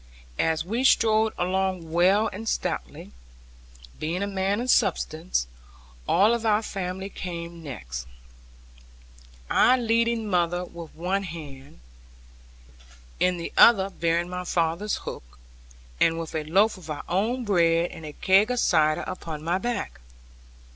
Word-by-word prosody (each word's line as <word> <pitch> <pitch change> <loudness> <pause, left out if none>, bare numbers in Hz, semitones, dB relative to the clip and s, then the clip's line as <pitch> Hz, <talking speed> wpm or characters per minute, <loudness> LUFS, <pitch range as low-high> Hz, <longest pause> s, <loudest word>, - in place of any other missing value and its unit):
As 160 -1 +1
he 225 +8 -2
strode 220 -4 +4
along 185 -2 -1
well 190 +6 +4
and 220 +3 -4
stoutly, - - -4 0.9
being 170 +5 -2
a - - -1
man 195 +1 -1
of 250 +1 +1
substance, 170 - 0 0.6
all 205 +6 +4
our 215 -1 +2
family 190 -1 -4
came 170 -3 -7
next, 60 - -7 1.4
I 255 - +4
leading 230 -1 +1
mother 175 -1 0
with 170 -2 -11
one 185 +4 -1
hand, 145 - -10 1.4
in 180 0 +2
the 170 - -6
other 195 -4 +6
bearing 170 0 0
my 180 0 -5
father's 170 +4 0
hook, - - -9 0.6
and 165 0 +3
with 165 -1 -6
a 155 -1 -3
loaf 195 +7 +3
of 165 -3 -13
our 150 - -4
own 225 +8 0
bread 170 -3 +2
and 160 - -10
a 150 -1 -7
keg 195 +7 +3
of 250 -1 0
cider 155 -6 +2
upon 160 -4 -6
my 175 +3 0
back. 190 - -4
180 Hz, 135 wpm, -25 LUFS, 165-205 Hz, 1.4 s, other